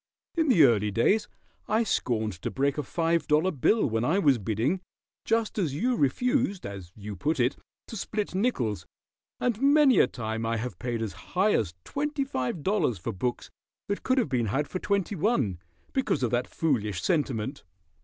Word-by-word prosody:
In 325 -2 +2
the 175 - +6
early 105 -5 +4
days 120 - +2 0.4
I 220 +2 +2
scorned 110 - 0
to - - -2
break 140 +2 0
a - - +2
five 165 +2 0
dollar 155 +5 +3
bill 200 - +2
when 115 -2 0
I 160 +9 +2
was 140 -10 +4
bidding, 115 - 0 0.4
just 225 -1 0
as 155 -8 0
you 245 - +1
refused, 235 - +1
as 95 -4 -7
you 105 -1 -7
put 150 - -1
it, 125 +3 +2 0.3
to - - -8
split 210 0 -3
nickels, 160 - -1 0.5
and 240 -2 0
many 280 -2 +5
a - - +6
time 110 -1 -4
I 115 0 0
have 110 -6 -5
paid 120 -2 -2
as 110 - -4 0.2
high 205 +3 +4
as 85 -6 0
twenty 295 0 -2
five 145 - -3
dollars 190 - +1
for 85 - -4
books 120 +6 -3 0.4
that 200 - -1
could 255 0 +1
have 245 - +2
been 120 -3 0
had 140 +8 0
for 185 +5 -4
twenty 200 0 0
one, 155 - 0 0.3
because 260 - 0
of 120 - +1
that 120 0 0
foolish 105 - -1
sentiment." 140 - -1
145 Hz, 185 wpm, -27 LUFS, -, 0.5 s, the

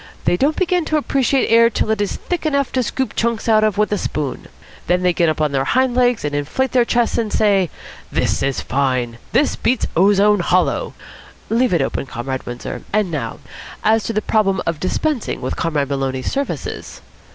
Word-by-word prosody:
They - - +3
don't 285 - +1
begin 360 -1 +1
to 310 - +1
appreciate 275 -2 +1
air 230 +1 +6
till 220 - -1
it 215 -2 0
is 205 - -1
thick 355 - -4
enough 280 -3 0
to 255 - +1
scoop 260 +2 -2
chunks 235 0 -1
out 215 -1 +4
of 215 -2 +1
with 210 0 +1
a 205 - 0
spoon. 145 -4 -4 0.4
Then 180 +1 +2
they 180 -1 +3
get 170 -1 +2
up 155 - -2
on 150 -2 +1
their 135 -1 +1
hind 255 - +2
legs 245 -6 +2
and 145 - -2
inflate 150 - -1
their 245 -2 +3
chests 235 -1 +1
and 220 -2 -2
say, 195 -5 +2 0.4
'This - - 0
is 135 -1 -1
fine! 130 -4 -1
This 290 - +2
beats 250 0 0
ozone 205 +3 +4
hollow!' 180 +1 +1 0.6
Leave 245 +2 +2
it 170 -6 +2
open, 135 - -3
Comrade 130 +2 -5
Windsor. 120 0 -6
And 210 -3 +1
now, 135 -8 -4 0.4
as 220 0 +3
to 230 - -2
the 215 0 -1
problem 195 -3 +1
of 165 -2 -2
dispensing 255 - -1
with - - -3
Comrade 150 -5 -1
Maloney's 135 -2 -2
services?" 280 0 -4
205 Hz, 195 wpm, -19 LUFS, 150-245 Hz, 0.6 s, air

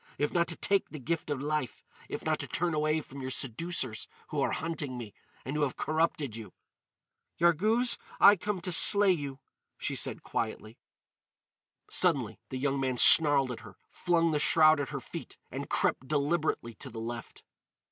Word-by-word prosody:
—if 145 - -1
not 170 -1 +1
to 165 - -5
take 200 +3 0
the 155 - -8
gift 160 +4 -4
of 145 -2 -2
life—if 150 -3 -5
not - - 0
to - - -5
turn 175 -1 -1
away 155 +1 0
from 140 -1 -11
your 130 - -5
seducers 130 -1 -3 0.2
who - - -2
are - - +1
hunting 150 -5 -4
me, 115 -4 -8 0.3
and 135 - -4
who 150 - -1
have 140 -3 -1
corrupted 155 -6 -1
you?" 110 -5 -10 0.9
"Yarghouz, 215 +9 +2 0.2
I 205 - +8
come 205 0 -4
to 180 - -4
slay 200 +3 +7
you," 140 -6 -3 0.4
she - - -4
said - - -2
quietly. 110 0 -5 1.1
Suddenly - - +2
the 130 - -5
man 135 -2 -2
snarled 140 -2 +7
at 120 - -7
her, 105 -5 -14
flung 170 -2 +1
the 150 - 0
shroud 155 0 +5
at 140 - -3
her - - -5
feet, - - -9
and - - -6
crept 130 - -1
deliberately 150 -4 -1
to - - -6
the 115 - -11
left. 115 0 -8
150 Hz, 170 wpm, -29 LUFS, 130-170 Hz, 1.1 s, I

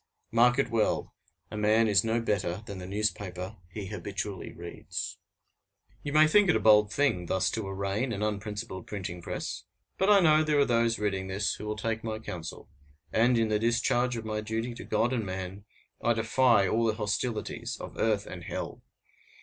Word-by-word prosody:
Mark 120 +2 +5
it 135 -3 +1
well: 115 -2 0 0.4
a 105 - -5
man 110 +2 +4
is 105 0 +4
no 115 +1 +1
better 100 -3 -1
than 100 -3 -7
the 90 - -7
newspaper 100 -1 -3
he 100 +2 -6
habitually 100 0 -5
reads. 85 0 -6 0.8
You 145 - -4
may 155 +1 +7
think 195 +5 +5
it - - +5
a - - +3
bold 105 -1 +5
thing 110 -9 +1
thus 95 +1 +1
to 110 -3 -3
arraign 100 +5 -2
an 105 -2 -2
unprincipled 105 -2 -4
printing 90 -4 -5
press, - - -4 0.4
but 190 - +3
I 205 -1 +8
know 155 -3 +5
there 155 -1 +2
are 140 - +5
those 115 -2 +2
reading 95 -2 -1
this 100 +3 0
who 105 - -7
will 105 0 -3
take 110 +1 -2
my 110 -1 -3
counsel; 85 -7 -7 0.5
and, 120 +2 +4
in 115 -1 +2
the 105 -1 +2
discharge 120 +2 +1
of 110 - -6
my 110 -1 -2
duty 115 +3 -3
to 120 - -8
God 120 +3 +1
and 115 -3 0
man, 95 +1 -5 0.4
I 120 - +4
defy 115 -2 +3
all 115 +3 +2
the 110 - +1
hostilities 105 +1 -2
of - - -8
earth 105 -2 +1
and 90 -2 -8
hell! - - -5
110 Hz, 190 wpm, -29 LUFS, 100-115 Hz, 0.8 s, I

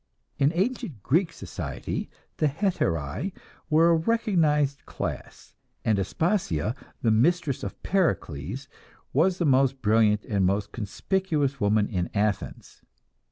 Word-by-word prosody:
In 140 +1 +4
ancient 195 - -2
Greek 165 +5 +2
society, - - -5 0.3
the 155 - +3
"hetairae" 140 - -1 0.4
were 165 +2 +5
a - - +5
recognized 160 - +1
class, - - -6 0.3
and 110 -3 +2
Aspasia, 110 - 0 0.3
the 115 - +4
mistress 145 +5 +2
of 100 - -7
Pericles, 135 - -1 0.5
was 175 +6 +3
the 170 - 0
most 135 -2 +3
brilliant 105 -1 +3
and 100 -3 0
most 100 +2 +1
conspicuous 140 - -1
woman 105 0 +3
in 90 -5 -2
Athens. 100 - -2
135 Hz, 115 wpm, -26 LUFS, 105-170 Hz, 0.5 s, were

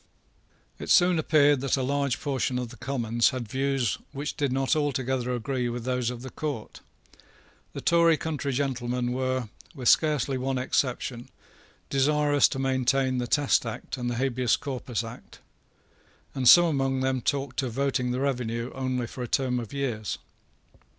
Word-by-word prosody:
It - - -7
soon 175 -2 +5
appeared 145 -3 +4
that 135 0 +1
a 130 - -1
large 140 -1 0
portion 130 -3 -1
of 125 -2 -3
the 120 - -11
Commons 120 -3 +1
had 130 -4 -5
views 135 -2 0
which 145 +1 -4
did 140 -4 -1
not 135 +2 +1
altogether 130 -4 -1
agree 125 +1 -2
with 120 0 -4
those 125 -1 -1
of 125 0 -6
the 130 - -7
Court. 145 -8 -5 0.9
The - - -6
Tory 170 -1 +4
country 150 -3 -3
gentlemen 125 -2 -1
were, 130 -2 -1 0.3
with 125 -4 +1
scarcely 145 -4 +2
one 130 +1 -1
exception, 125 -1 -1 0.6
desirous 145 +1 +3
to 135 - -5
maintain 130 0 +1
the 120 - -2
Test 145 +2 +2
Act 115 -2 -5
and 120 -1 -3
the 120 - -2
Habeas 125 -1 +1
Corpus 125 -4 -4
Act; 115 +2 -11 1.0
and 130 -3 +4
some 175 0 +9
among 135 -4 0
them 130 -1 0
talked 140 +1 -1
of 125 -4 -4
voting 135 -1 0
the 125 +1 -1
revenue 120 -3 -2
only 130 -2 -2
for 125 - -8
a 125 - -3
term 125 0 0
of 115 -3 -7
years. 120 -7 -3
130 Hz, 165 wpm, -27 LUFS, 125-140 Hz, 1.0 s, some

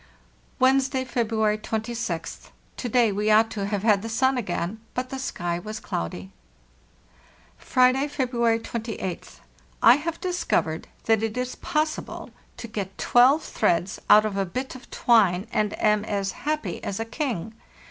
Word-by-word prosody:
"Wednesday, 260 0 +2
February 220 -3 0
26th. 220 -6 -4 0.3
To 245 - -3
day 235 -2 +3
we 210 +2 0
ought 220 +1 +5
to 200 -2 -3
have 205 -1 -2
had 210 -3 +4
the 225 - -5
sun 260 +4 +2
again, 195 -3 -3 0.2
but 255 0 -3
the 270 - -4
sky 175 -9 -3
was 215 +3 -6
cloudy. 90 +3 -5 1.3
"Friday, 255 +2 +3
February 240 -5 +1
28th. 225 -5 -6 0.4
I 240 +3 +7
have 330 +2 -4
discovered 350 - -1 0.2
that 225 -1 +3
it 225 +1 -2
is 250 0 -2
possible 310 0 -3 0.3
to 235 - -7
get 200 -3 -5
12 260 +6 +4
threads 175 +2 0
out 215 +1 +8
of 205 -2 -2
a 195 - +2
bit 255 +9 -4
of 255 0 -13
twine, 200 -6 +3
and 210 -1 0
am 210 -1 +3
as 200 -2 -2
happy 300 - -3
as 195 - -3
a 225 - -2
king. 225 - -3
225 Hz, 150 wpm, -25 LUFS, 200-255 Hz, 1.3 s, out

